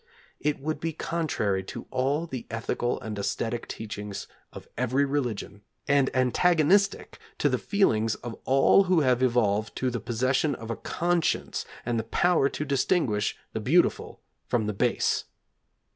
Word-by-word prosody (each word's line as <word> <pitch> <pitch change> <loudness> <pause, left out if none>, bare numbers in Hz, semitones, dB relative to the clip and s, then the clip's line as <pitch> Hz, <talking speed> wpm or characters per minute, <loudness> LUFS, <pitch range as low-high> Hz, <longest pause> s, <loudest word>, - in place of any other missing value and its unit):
It 150 -1 -1
would 155 +2 -3
be 165 +1 -2
contrary 140 - -1
to - - -7
all 135 +5 0
the 130 -7 -7
ethical 115 +2 -2
and 110 -1 -5
æsthetic 115 +3 -2
teachings 105 -2 -6 0.3
of - - -11
every 125 +3 +1
religion, 120 -7 -3 0.3
and 140 -1 +3
antagonistic 175 - +2 0.2
to - - +2
the - - 0
feelings 115 - +2
of 120 -1 -7
all 135 +8 +5
who 180 -3 +3
have 130 -3 +2
evolved 110 -4 +1
to 130 -1 -1
the 120 - -2
possession 130 +5 0
of 115 0 -7
a - - -2
conscience 175 +5 -1 0.2
and 120 -1 0
the - - -2
power 140 +5 +2
to 150 - -4
distinguish 135 - +1 0.2
the - - -2
beautiful - - +1 0.3
from 115 -3 +1
the 105 - -1
base. 95 - +1
130 Hz, 150 wpm, -27 LUFS, 115-150 Hz, 0.3 s, all